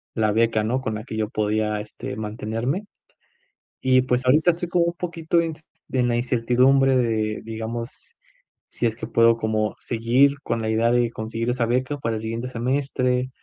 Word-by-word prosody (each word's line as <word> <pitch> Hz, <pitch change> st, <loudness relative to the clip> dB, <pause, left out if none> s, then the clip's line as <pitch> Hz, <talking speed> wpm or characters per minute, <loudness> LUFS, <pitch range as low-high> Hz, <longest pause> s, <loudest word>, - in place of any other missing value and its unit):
la 110 Hz, -2 st, +2 dB
beca, 110 Hz, 0 st, +2 dB
¿no?, 125 Hz, +4 st, 0 dB
con 110 Hz, -3 st, -3 dB
la 110 Hz, -, -5 dB
que 115 Hz, -, -7 dB
yo 110 Hz, -1 st, -1 dB
podía, 105 Hz, 0 st, 0 dB
este, 105 Hz, -, -7 dB
mantenerme. 115 Hz, -, -3 dB, 1.0 s
Y, 130 Hz, 0 st, +4 dB
pues, 125 Hz, 0 st, 0 dB
ahorita 155 Hz, +7 st, +5 dB
estoy 175 Hz, +1 st, -5 dB
como 175 Hz, 0 st, +2 dB
un 170 Hz, -, -1 dB
poquito 170 Hz, -1 st, -1 dB
en 165 Hz, -, -1 dB
ints 155 Hz, -1 st, -8 dB, 0.3 s
en 125 Hz, -2 st, +2 dB
la 120 Hz, -, +1 dB
incertidumbre 130 Hz, +2 st, +3 dB
de, 110 Hz, -3 st, 0 dB
digamos, 115 Hz, -, -6 dB, 0.6 s
si 120 Hz, -, -3 dB
es 110 Hz, -, -2 dB
que -, -, -6 dB
puedo 115 Hz, 0 st, +4 dB
como 110 Hz, -1 st, -1 dB
seguir 130 Hz, +5 st, +2 dB
con 115 Hz, -1 st, -2 dB
la 110 Hz, -, -2 dB
idea 115 Hz, +2 st, +2 dB
de 120 Hz, -1 st, +2 dB
conseguir 115 Hz, +2 st, -3 dB
esa 120 Hz, -1 st, 0 dB
beca 130 Hz, +4 st, 0 dB
para 115 Hz, -3 st, -2 dB
el -, -, -6 dB
siguiente 115 Hz, +3 st, -4 dB
semestre, 125 Hz, 0 st, 0 dB
120 Hz, 185 wpm, -23 LUFS, 110-130 Hz, 1.0 s, ahorita